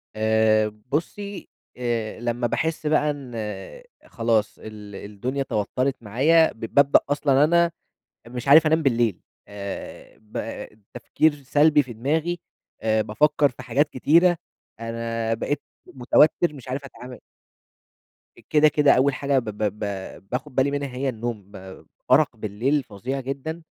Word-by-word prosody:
آآ 110 0 +3 0.2
بُصّي، 200 +6 -4 0.3
آآ، 115 -3 -2
لمّا 120 0 -1
باحس 160 +4 -2
بقى 150 0 +2
إن 140 -4 -9 0.8
خلاص 115 -2 0
ال 105 -2 -10
الدنيا 120 +7 -4
توتّرِت 130 +3 -1
معايا، 155 +10 +3
ب - - -23
بابدأ 140 0 +6
أصلًا 145 -1 +3
أنا 170 +2 +3 0.6
مش 125 +2 -6
عارف 155 +2 +8
أنام 160 +1 +3
بالليل 120 - +1 0.3
آآ، 100 -1 -8
ب 110 +1 -6 0.3
تفكير 145 +4 0
سلبي 150 +2 +4
في 125 -2 -9
دماغي، 160 +9 -1 0.4
آآ 110 -1 +2
بافكّر 150 +6 +2
في 130 0 -12
حاجات 135 +5 +1
كتيرة، 170 +7 +4 0.4
أنا 115 0 -2
بقيت 145 +6 -3 0.3
متوتَّر، 150 +6 +3
مش 135 -2 -12
عارف 135 +2 -4
أتعامل. 125 -1 -10 1.3
كده، 155 0 +5
كده 145 -1 +4
أول 135 +2 +3
حاجة 140 0 +1
ب 120 - -8
ب 105 0 -3
ب - - -4 0.5
باخد 130 +2 -4
بالي 135 +1 +2
منها 140 -3 -3
هي 135 +1 -1
النوم، 110 -4 -5 0.6
أرق 140 -1 +4
بالليل 115 +7 -1
فظيع 125 +5 -5
جدًا، 140 +5 -5
130 Hz, 135 wpm, -24 LUFS, 115-150 Hz, 1.3 s, عارف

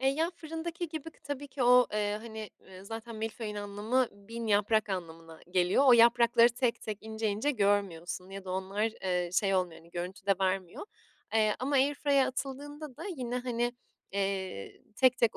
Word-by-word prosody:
Eee, 265 - +3
ya, 320 +5 0
fırındaki 330 +1 -5
gibi 315 0 -6
tabii 285 0 -5
ki 270 0 -3
o, 250 0 +7
eee, 210 0 0
hani, 220 -2 -7 0.2
eee, 190 0 -12
zaten 225 +2 -7
milföyün 220 0 -4
anlamı 205 +5 0
1.000 225 +3 -7
yaprak 215 +1 +3
anlamına 165 -3 -6
geliyor. 180 +8 +3
O 260 - +9
yaprakları 235 0 +6
tek 245 -1 0
tek, 215 -2 -4
ince 220 0 -3
ince 215 +8 0
görmüyorsun 195 - 0
ya 195 0 -7
da 185 - -6
onlar, 190 +2 -2 0.2
eee, 180 -2 0
şey 195 +1 +2
olmuyor, 175 -3 -1
hani, 165 +1 -19
görüntü 180 +4 -6
de 200 - +5
vermiyor. 185 - -1 0.5
Eee, 215 -1 +4
ama 275 +3 -1
air 275 +2 +4
fryer'a 280 -2 +3
atıldığında 285 +1 -6
da - - -8
yine, 250 -1 -2
hani, 240 -1 -1 0.4
eee, 195 - -3
tek 255 -1 +5
tek 230 -2 +2
220 Hz, 175 wpm, -31 LUFS, 195-255 Hz, 0.5 s, O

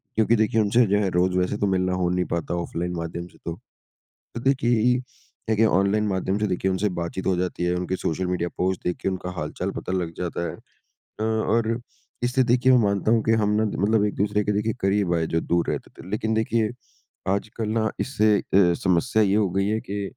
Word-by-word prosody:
क्योंकि 110 +1 +3
देखिए 110 0 +2
उनसे 115 +4 +4
जो 100 +1 +2
है 95 - +1
रोज़ 90 +1 +2
वैसे 90 +3 0
तो 100 - 0
मिलना 95 -1 +1
हो 90 -1 +1
नहीं 90 0 0
पाता 85 +1 -2
ऑफ़लाइन 85 0 -3
माध्यम 85 +1 -5
से - - -20
तो। 85 - -3 0.8
तो 115 - -4
देखिए 120 -3 +2
ई - - +2 0.5
देखिए 110 0 +3
ऑनलाइन 100 +2 +2
माध्यम 95 +1 -1
से 105 - 0
देखिए 95 +1 0
उनसे 95 +3 +1
बातचीत 85 +2 -4
हो 95 - +3
जाती 90 -1 -2
है। 90 0 +1
उनके 90 +1 -2
सोशल 90 +2 -2
मीडिया 90 -1 -1
पोस्ट 95 0 0
देख 90 - -1
के - - 0
उनका 95 -1 -3
हाल-चाल - - -3
पता - - -5
लग 90 -3 -1
जाता 85 -1 -3
है। - - -8
अ, - - -26 0.4
और 110 +1 +1 0.4
इसलिए 130 +1 +2
देखिए 125 +2 +4
मैं 125 - +6
मानता 100 +1 +1
हूँ 115 -1 +3
कि 115 - +3
हम 105 - +2
ना - - +2
मतलब 105 +1 +1
एक-दूसरे 105 0 0
के 105 - +1
देखिए 105 +2 0
करीब 95 -2 +1
आए 80 -1 +1
जो 80 - +3
दूर 85 +1 0
रहते - - -4
थे। - - -12
लेकिन 110 +2 -1
देखिए 110 0 +1 0.6
आजकल 110 +2 -3
ना 110 0 +1
इससे 110 -6 +2
अ, - - -4 0.3
समस्या 90 +5 +2
ये 100 0 +2
हो 105 -3 +2
गई 95 +2 +1
है 110 +1 0
कि 100 +1 -4
100 Hz, 215 wpm, -24 LUFS, 90-110 Hz, 0.8 s, मैं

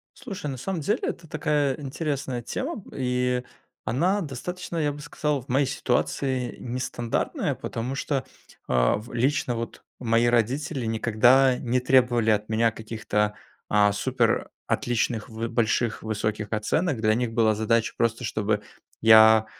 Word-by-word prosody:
Слушай, 195 - -6
на 130 - -5
самом 175 +6 -3
деле 180 +8 0
это 165 -2 -4
такая 145 -3 0
интересная 135 -3 -3
тема, 260 - -4
и 125 -1 0 0.4
она 170 - +1
достаточно, 175 +4 -5
я 150 -2 +1
бы 145 - -9
сказал, 150 -1 -2
в 135 - -21
моей 135 +2 +2
ситуации 130 0 -1
нестандартная, 120 -1 -2
потому 120 +4 -4
что, 135 -2 -1 0.4
а, - - +3
в 105 +3 -9
лично 130 +2 +1
вот 115 0 -6 0.2
мои 115 -1 +2
родители 125 +4 0
никогда 120 +4 +4
не 125 +1 0
требовали 125 -3 +3
от 105 0 +1
меня 115 +1 +2
каких-то, 110 -1 -2 0.3
а, 105 -1 +4
супер 120 +2 0 0.2
отличных 115 -2 -1
в 115 +1 -4
больших, 115 0 0
высоких 105 -1 -2
оценок. 130 +6 0
Для 110 -1 +3
них 120 0 -1
была 110 -1 +3
задача 110 +1 +1
просто, 115 +1 0
чтобы 105 -1 -1 0.4
я 110 0 +7
120 Hz, 140 wpm, -25 LUFS, 110-135 Hz, 0.4 s, я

